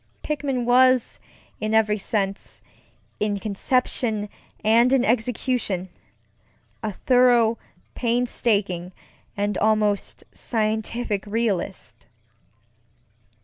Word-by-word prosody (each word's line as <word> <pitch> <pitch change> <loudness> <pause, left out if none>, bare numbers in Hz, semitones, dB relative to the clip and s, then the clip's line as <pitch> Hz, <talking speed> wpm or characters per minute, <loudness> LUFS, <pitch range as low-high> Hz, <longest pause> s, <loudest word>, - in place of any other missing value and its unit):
Pickman 275 -5 -2
was 255 0 +4 0.4
in 215 +1 -1
every 215 -1 +3
senseŌĆöin 200 +1 -5
conception 215 0 -1 0.3
and 230 +3 +4
in 265 -2 +3
executionŌĆöa 230 -5 -1 1.2
thorough, 245 -3 +4 0.3
painstaking, 210 -7 -1 0.4
and 205 0 -1
almost 210 -2 0
scientific 220 -1 -2
realist. 195 - -3
220 Hz, 65 wpm, -23 LUFS, 205-245 Hz, 1.2 s, was